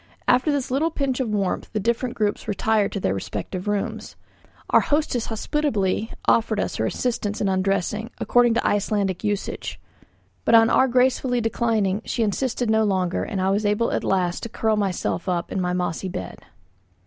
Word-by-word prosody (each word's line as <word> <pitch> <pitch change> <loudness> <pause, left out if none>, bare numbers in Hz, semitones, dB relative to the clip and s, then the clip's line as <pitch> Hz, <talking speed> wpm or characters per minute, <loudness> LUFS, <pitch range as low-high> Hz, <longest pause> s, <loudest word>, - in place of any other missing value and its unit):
After 255 +5 +4
this 280 -3 -1
little 295 +5 +2
pinch 275 -5 -2
of 255 -4 -1
warmth 200 -3 -1
the 215 - 0
different 235 +4 -1
groups 210 -1 -1
retired 210 0 +1
to 200 - -2
their 95 - 0
respective 105 - -5
rooms. 205 -1 -3 0.6
Our - - +7
hostess 290 -6 0
hospitably 225 -4 -1 0.2
offered 220 -2 +2
us - - -2
her 110 - 0
assistance 215 - -2
in 205 - 0
undressing, 195 +3 0
according 240 -1 +3
to - - 0
Icelandic 200 -2 0
usage; 205 -1 -3 0.6
but 230 - +4
on 225 0 +6
our 265 - +5
gracefully 250 0 +2
declining, 220 -3 0
she 235 - -1
insisted 240 +3 -1
no 220 0 +3
longer, 185 -3 0
and 205 -4 -3
I 190 +1 +1
was 205 +2 +1
able 210 +3 +1
at - - -1
last 180 -2 0
to 230 - -5
curl 220 -1 0
myself 195 -2 -1
up 175 -1 -2
in 190 - -1
my 180 0 0
mossy 180 +1 -2
bed. 90 - -7
210 Hz, 175 wpm, -23 LUFS, 190-235 Hz, 0.6 s, Our